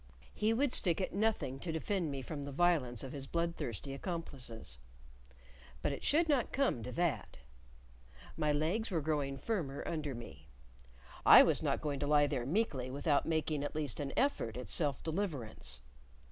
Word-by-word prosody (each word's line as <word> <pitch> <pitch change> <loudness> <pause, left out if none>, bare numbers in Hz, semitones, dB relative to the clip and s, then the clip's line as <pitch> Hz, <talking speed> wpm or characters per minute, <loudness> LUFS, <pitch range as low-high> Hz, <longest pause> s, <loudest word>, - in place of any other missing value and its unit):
He 215 +1 +1
would 255 +3 +1
stick 175 -2 +5
at 185 - -2
nothing 200 -10 0
to 165 - -3
defend 165 +1 -1
me 135 -2 -4
from 145 +2 -5
the 140 0 -6
violence 140 -7 +1
of 135 - -6
his 135 -2 -5
bloodthirsty 155 - -3
accomplices. 135 - -3 1.0
But - - +1
it 140 - -6
should 325 +3 +3
not 280 -6 +1
come 265 - +1
to 125 - -6
that. 175 +4 -1 1.0
My 150 -1 +1
legs 165 +10 0
were 170 -5 0
growing 145 -2 -1
firmer 150 -7 -3
under 150 -5 -3
me. 80 -11 -11 0.8
I - - +10
was - - +2
not - - 0
going 145 -2 -2
to 145 - -2
lie 145 0 +5
there 130 -4 -2
meekly 145 - 0
without 145 +2 +1
making 155 -2 0
at 145 - -4
least 150 -6 -1
an 140 -2 -3
effort 185 - 0
at 125 - -5
self 145 -6 +3
deliverance. 150 - -3
150 Hz, 170 wpm, -34 LUFS, 135-175 Hz, 1.0 s, I